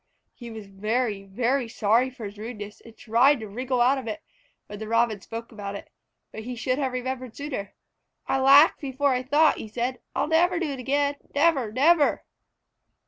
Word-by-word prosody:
He 240 -2 -10
was 220 -2 -8
very, 210 +2 -2
very 245 +6 0
sorry 225 +3 +2
for 250 -3 -9
his 205 +1 -9
rudeness, 210 -2 -8
and 230 -1 -15
tried 250 +5 +3
to 220 - -7
wriggle 250 +4 -2
out 265 +3 +4
of 250 - -9
it, 215 -1 -5 0.4
when 205 0 -9
the 220 - -6
Robin 230 -2 +1
spoke 230 +3 -8
about 200 -2 -6
it, - - -10 0.4
but 220 - -7
he 245 +3 -6
should 255 +3 -1
have 265 -2 -1
remembered 255 -1 -4
sooner. 270 -9 -6 0.5
"I 270 - 0
laughed 275 +4 +6
before 275 0 0
I 250 - 0
thought," 295 +4 +3
he - - -6
said. 245 +4 -3 0.2
"I'll - - +1
never 340 +3 +2
do 335 -4 -2
it 270 - -6
again. 285 +2 0 0.2
Never! 285 -7 +2
Never!" 290 +5 +3
250 Hz, 190 wpm, -25 LUFS, 220-275 Hz, 0.5 s, laughed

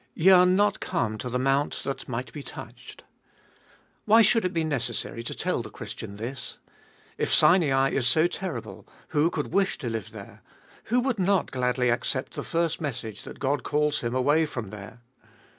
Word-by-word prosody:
Ye 185 +4 +5
are 180 -1 +7
not 200 +2 +3
come 110 - -2
to 125 - -4
the 125 - -1
mount 135 +3 0
that 135 - -5
might 125 +1 -4
be 150 - -6
touched. - - -11 1.0
Why 225 +2 +7
should 225 +2 +4
it 180 - 0
be 165 -2 0
necessary 125 -6 -2
to 115 - -5
tell - - -1
the - - -8
Christian 100 - -8
this? 120 +5 -6 0.6
If - - 0
Sinai 135 -7 +4
is 130 -2 +1
so 155 +6 +4
terrible, 115 - -5 0.2
who 155 +1 +2
could - - -4
wish 195 -1 +2
to 120 - -4
live 110 -3 -5
there? - - -11 0.4
who 245 +2 +2
would 245 -4 -1
not 190 0 +2
gladly 125 -1 +1
accept 130 +2 -1
the - - -4
first 165 -1 -1
message 125 -7 -5
that - - -9
God 140 0 0
calls 150 0 0
him 120 +1 -3
away 145 +5 +3
from 120 -8 -5
there 105 +3 -10
140 Hz, 180 wpm, -26 LUFS, 120-175 Hz, 1.0 s, are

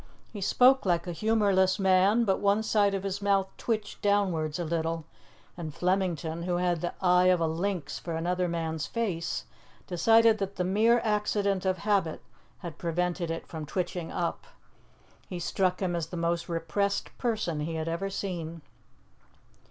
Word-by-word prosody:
He 205 - -6
spoke 255 +7 +5
like 175 -2 +1
a 175 - -4
humourless 195 -1 +2
man, 195 +3 +4
but 195 -2 +1
one 205 +2 +2
side 205 -2 +2
of 195 - -3
his 195 0 -3
mouth 195 -1 +2
twitched 215 -3 -3
downwards 185 -7 +1
a 175 - -3
little, 165 0 -2 0.5
and 165 -3 -5
Flemington, 175 -3 -1
who 175 0 -1
had 175 -2 0
the 175 - -3
eye 180 0 +4
of 180 -1 +4
a 165 - +1
lynx 165 -2 -2
for 170 -2 -5
another 180 +2 0
man's 160 -3 -2
face, 190 -8 -2 0.4
decided 225 +4 +4
that 195 0 -3
the 180 - -1
mere 220 +6 +3
accident 205 -3 0
of 185 0 +1
habit 190 -3 0 0.4
had 165 -3 -7
prevented 175 0 -1
it 165 0 -4
from 160 -2 -7
twitching 175 0 -3
up. 170 - -2 0.8
He 180 - -4
struck 185 +2 0
him 175 -2 0
as 165 -2 -2
the 175 - -7
most 170 0 -1
repressed 170 +5 -1
person 215 -10 -1
he 160 +2 -3
had 160 0 -3
ever 170 +4 -2
seen. 170 -5 -5
180 Hz, 165 wpm, -28 LUFS, 170-200 Hz, 0.8 s, spoke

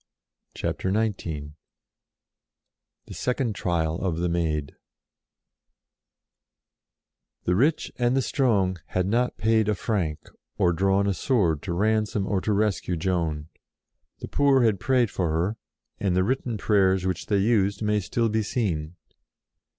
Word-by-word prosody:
CHAPTER 95 - -2
XIX 95 -9 -2 1.6
THE - - -10
SECOND 125 -2 -1
TRIAL 85 -4 -1
OF 90 -4 -1
THE 85 +1 0
MAID 80 -4 -1 2.7
n^HE 90 - +2
rich 145 - +1
and 120 +2 +2
the 135 - +2
strong 100 - +1
had 90 -1 -1
not 120 +5 0
paid 110 -1 +2
^ - - +1
a 105 - +2
franc, 90 -6 -2 0.3
or 85 - +3
drawn 95 +3 +2
a 100 - +1
sword 90 - +1
to 85 - -4
ransom 105 +1 +1
or 95 -2 0
to 110 - -1
rescue 100 -4 0
Joan. 80 -3 -1 0.7
The - - -5
poor 140 -3 +3
had 110 -5 +2
prayed 125 -3 +2
for 90 -3 -1
her, 85 +8 -1 0.4
and 95 -3 0
the 95 - +3
written 120 0 -1
prayers 95 -3 +2
which 95 -1 -2
they 100 - +2
used 100 -1 +1
may 105 0 +2
still 115 +4 0
be 110 0 0
seen. 90 -8 -2
100 Hz, 140 wpm, -25 LUFS, 90-110 Hz, 2.7 s, or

